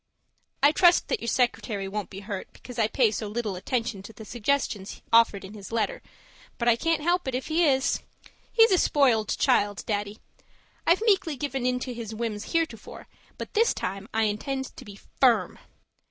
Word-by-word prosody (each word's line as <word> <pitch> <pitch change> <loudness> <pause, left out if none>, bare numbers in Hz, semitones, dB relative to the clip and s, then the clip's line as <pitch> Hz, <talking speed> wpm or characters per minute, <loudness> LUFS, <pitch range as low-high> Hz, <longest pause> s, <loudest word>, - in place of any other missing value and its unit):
I 285 - +7
trust 350 +2 +4
that - - 0
your - - -5
secretary 225 -4 0
won't 205 +1 -4
be 195 0 -9
hurt 200 -2 -6
because 250 -2 -10
I 220 - +3
pay 230 -1 +2
so 215 0 -3
little 210 -2 -3
attention 230 +1 -2
to 200 - -11
the 220 +1 -11
suggestions 230 -3 -2
offered 225 -4 +4
in 195 - -10
his 205 -1 -10
letter, - - -1 0.6
but 235 - -2
I 235 - +6
can't 330 +4 0
help 350 -1 +1
it 260 - -1
if 260 - -4
he 330 +2 +3
is. 265 -2 +2 0.5
He's 455 -1 +5
a 370 - +4
spoiled 245 -8 +2
child, 205 0 +2
Daddy. 205 0 -2 0.7
I've 350 +6 +4
meekly 385 - +2
given 270 -2 -2
in 250 0 +1
to 250 - -4
his 225 -2 -6
whims 220 -2 -4
heretofore, 325 -9 -3 0.3
but - - -7
this 460 +2 +3
time 195 +3 -5
I 225 0 +1
intend 265 +6 -2
to - - -10
be 205 - -11
FIRM. 245 +3 +1
235 Hz, 185 wpm, -26 LUFS, 210-285 Hz, 0.7 s, I